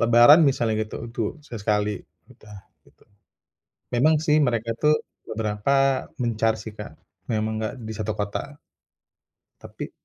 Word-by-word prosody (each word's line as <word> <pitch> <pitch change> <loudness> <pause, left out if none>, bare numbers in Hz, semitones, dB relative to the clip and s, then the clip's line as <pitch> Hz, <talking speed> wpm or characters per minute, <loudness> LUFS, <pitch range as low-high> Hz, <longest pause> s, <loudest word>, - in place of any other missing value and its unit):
lebaran 120 +7 +7
misalnya 120 -5 +1
gitu. - - -8
Itu 115 0 -3 0.2
sesekali 105 -5 -1 0.3
udah 105 -1 -14 0.3
gitu. - - -25 0.9
Memang 155 +6 +4
sih 155 -1 +2
mereka 115 -3 0
tuh 150 0 +4 0.3
beberapa 120 +6 +1
mencar 115 -2 +1
sih, 110 0 -8
Kak. 105 - -8 0.4
Memang 110 0 0
gak 110 - -3
di 110 - -5
satu 110 - -2
kota. 105 +8 -4 1.0
Tapi - - -8
115 Hz, 125 wpm, -24 LUFS, 105-135 Hz, 1.0 s, lebaran